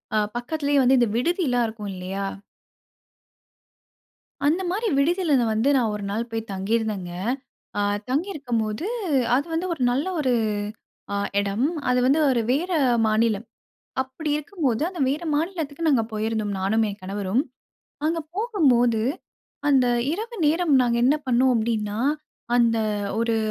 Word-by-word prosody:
அ -, -, +4 dB, 0.2 s
பக்கத்லயே 285 Hz, +2 st, 0 dB
வந்து 260 Hz, +1 st, +5 dB
இந்த 240 Hz, -3 st, +3 dB
விடுதிலாம் 255 Hz, -5 st, +1 dB
இருக்கும் 210 Hz, -2 st, -6 dB
இல்லையா? 190 Hz, +2 st, -4 dB, 2.2 s
அந்த 330 Hz, +6 st, +2 dB
மாரி 430 Hz, +5 st, -1 dB
விடுதில 330 Hz, +1 st, +2 dB
நா 235 Hz, -, +2 dB
வந்து 225 Hz, +6 st, +2 dB
நான் 230 Hz, -4 st, +1 dB
ஒரு 205 Hz, -, -5 dB
நாள் 230 Hz, +3 st, -2 dB
போய் 225 Hz, -1 st, -4 dB
தங்கிருந்தேங்க. 195 Hz, -1 st, -1 dB, 0.7 s
அ -, -, +2 dB, 0.3 s
தங்கிருக்கும் 280 Hz, -, -1 dB
போது 215 Hz, -, -3 dB, 0.5 s
அது 285 Hz, +4 st, +1 dB
வந்து 345 Hz, +3 st, -1 dB
ஒரு 310 Hz, -, -8 dB
நல்ல 270 Hz, +4 st, 0 dB
ஒரு 260 Hz, -4 st, +2 dB, 0.8 s
அ -, -, 0 dB, 0.2 s
எடம். 200 Hz, +4 st, -1 dB, 0.2 s
அது 250 Hz, 0 st, +3 dB
வந்து 285 Hz, +4 st, +4 dB
ஒரு 245 Hz, -3 st, +2 dB
வேற 340 Hz, +8 st, 0 dB, 0.4 s
மாநிலம். 220 Hz, 0 st, +1 dB, 0.6 s
அப்டி 265 Hz, +4 st, -5 dB
இருக்கும்போது, 300 Hz, -, -1 dB
அந்த 365 Hz, -3 st, -9 dB
வேற 295 Hz, +5 st, -1 dB
மாநிலத்துக்கு 325 Hz, -2 st, -2 dB
நாங்க 260 Hz, -7 st, +4 dB
போயிருந்தோம். 215 Hz, -1 st, -1 dB
நானும், 210 Hz, +4 st, +2 dB
என் 200 Hz, +1 st, -7 dB
கணவரும். 200 Hz, +5 st, -1 dB, 0.6 s
அங்க 330 Hz, +1 st, +1 dB, 0.2 s
போகும்போது 260 Hz, -, +2 dB, 0.7 s
அந்த 265 Hz, -3 st, +4 dB, 0.3 s
இரவு 450 Hz, +6 st, -4 dB
நேரம் 320 Hz, 0 st, +3 dB
நாங்க 235 Hz, -1 st, +1 dB
என்ன 275 Hz, -, +5 dB
பண்ணோம் 255 Hz, +1 st, +3 dB
அப்டின்னா, 220 Hz, -2 st, -1 dB, 0.6 s
அந்த 230 Hz, -1 st, +4 dB, 0.4 s
ஒரு 230 Hz, -1 st, +1 dB
250 Hz, 135 wpm, -24 LUFS, 220-305 Hz, 2.2 s, வந்து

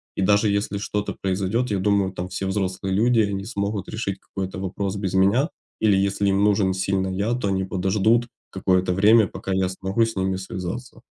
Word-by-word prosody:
И -, -, -2 dB
даже 105 Hz, +3 st, +3 dB
если 100 Hz, 0 st, -1 dB
что-то 105 Hz, 0 st, -3 dB
произойдет, 100 Hz, +5 st, -1 dB
я 100 Hz, -, 0 dB
думаю, 100 Hz, -1 st, +2 dB
там 90 Hz, 0 st, -5 dB
все 95 Hz, +1 st, -4 dB
взрослые 95 Hz, -1 st, -2 dB
люди 115 Hz, +4 st, +3 dB
и -, -, +5 dB
они 95 Hz, 0 st, -3 dB
смогут 100 Hz, -2 st, -3 dB
решить 100 Hz, -3 st, -3 dB
какой-то 95 Hz, -1 st, -6 dB
вопрос 95 Hz, +1 st, -3 dB
без 95 Hz, -2 st, -2 dB
меня, 100 Hz, -, +3 dB, 0.3 s
или 105 Hz, -3 st, +4 dB
если 100 Hz, +1 st, +1 dB
им 100 Hz, +1 st, +2 dB
нужен 100 Hz, -2 st, +3 dB
сильно 95 Hz, 0 st, 0 dB
я, 100 Hz, +5 st, -1 dB
то 120 Hz, -4 st, -1 dB
они 95 Hz, 0 st, 0 dB
подождут 105 Hz, +5 st, +1 dB, 0.2 s
какое-то 95 Hz, -1 st, +1 dB
время, 105 Hz, +2 st, +5 dB
пока 95 Hz, -, -6 dB
я 95 Hz, 0 st, +1 dB
смогу 95 Hz, +4 st, 0 dB
с 115 Hz, -, -5 dB
ними 95 Hz, 0 st, 0 dB
связаться. 95 Hz, +5 st, -6 dB
95 Hz, 195 wpm, -23 LUFS, 95-105 Hz, 0.3 s, и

